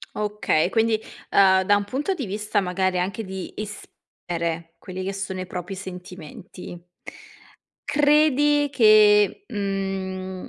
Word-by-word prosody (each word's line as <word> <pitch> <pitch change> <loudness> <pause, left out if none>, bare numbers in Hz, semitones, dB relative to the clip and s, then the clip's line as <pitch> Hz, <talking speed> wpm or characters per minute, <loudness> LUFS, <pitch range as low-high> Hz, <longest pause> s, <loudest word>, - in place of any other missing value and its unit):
Okay, 210 -5 0
quindi, 225 -1 +2 0.3
uhm, 190 -1 +5
da 205 +2 +4
un 205 - 0
punto 285 - -2
di 275 - -4
vista, 210 +1 -1
magari, 185 0 -1
anche 195 +4 -2
di 190 -1 -7
esprimere, 170 -5 -6
quelli 185 0 -7
che 195 +1 -3
sono 190 -1 -5
i - - -5
propri 180 +1 -6
sentimenti, 180 -1 -10 1.0
credi 295 0 +3
che, 215 - +5
mhmm, 190 -2 -4
195 Hz, 120 wpm, -23 LUFS, 185-215 Hz, 1.0 s, uhm